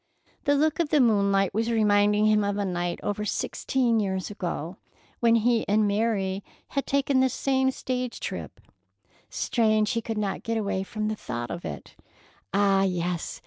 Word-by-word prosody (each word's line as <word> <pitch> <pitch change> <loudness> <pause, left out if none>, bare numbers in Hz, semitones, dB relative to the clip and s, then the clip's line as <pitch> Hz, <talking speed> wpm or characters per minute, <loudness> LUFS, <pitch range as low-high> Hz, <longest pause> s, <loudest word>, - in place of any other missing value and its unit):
The 285 0 +4
look 310 +3 +1
of 335 -3 +1
the 300 - +3
moonlight 200 -5 +3
was 225 +3 0
reminding 210 -1 +3
him 215 -1 +4
of 200 0 -1
a 205 - 0
night 175 -1 -2
over 205 +1 -2
sixteen 235 +2 0
years 190 -2 -2
ago, 175 -3 -4 0.4
when 230 -1 +4
he 230 0 +2
and 210 +1 +3
Mary 200 -2 0 0.3
had 275 - -2
taken 275 -1 +2
this 260 0 +2
same 265 -1 +1
stage 255 -2 -3
trip. - - -6 0.7
Strange 215 -2 +1
he 230 -2 -1
could 225 0 -4
not 205 -2 -2
get 230 0 -2
away 200 -3 -1
from 215 +2 -3
the 215 - -1
thought 120 - -5
of 170 - -6
it. - - -7 0.6
Ah, 195 -1 +3
yes! 180 -2 -2
210 Hz, 170 wpm, -26 LUFS, 195-235 Hz, 0.7 s, The